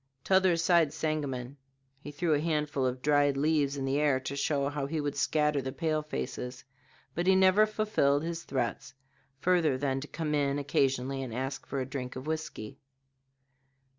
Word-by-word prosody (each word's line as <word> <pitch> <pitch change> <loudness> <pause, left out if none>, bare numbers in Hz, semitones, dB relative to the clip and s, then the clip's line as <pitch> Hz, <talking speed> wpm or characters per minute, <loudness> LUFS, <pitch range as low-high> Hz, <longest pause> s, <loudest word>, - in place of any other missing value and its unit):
T'other 190 -2 +4
side 165 -2 +3
Sangamon." 140 -5 -3 0.4
He 145 - -9
threw 160 +2 0
a 145 - +2
handful 150 -4 0
of 125 0 -4
dried 145 -1 +3
leaves 145 -1 +1
in 135 - -2
the 135 +2 +1
air 145 -3 +3
to 135 +2 -4
show 140 0 0
how 145 -1 -3
he 155 +2 -2
would 145 -1 -2
scatter 150 +1 +1
the 130 0 -4
pale 155 +3 -1
faces, 125 -4 -5 0.5
but 175 +4 -2
he 190 - +6
never 190 +3 +5
fulfilled 210 -10 +1
his 170 0 -3
threats 130 0 -3 0.4
further 170 -4 +2
than 135 -1 -1
to 150 - -7
come 155 -1 -3
in 140 -1 +1
occasionally 135 -1 0
and 120 -4 -5
ask 135 +1 -4
for 140 - -3
a 130 - -1
drink 130 -1 -5
of 130 +1 -7
whisky. 155 -9 -5
145 Hz, 175 wpm, -30 LUFS, 135-160 Hz, 0.5 s, he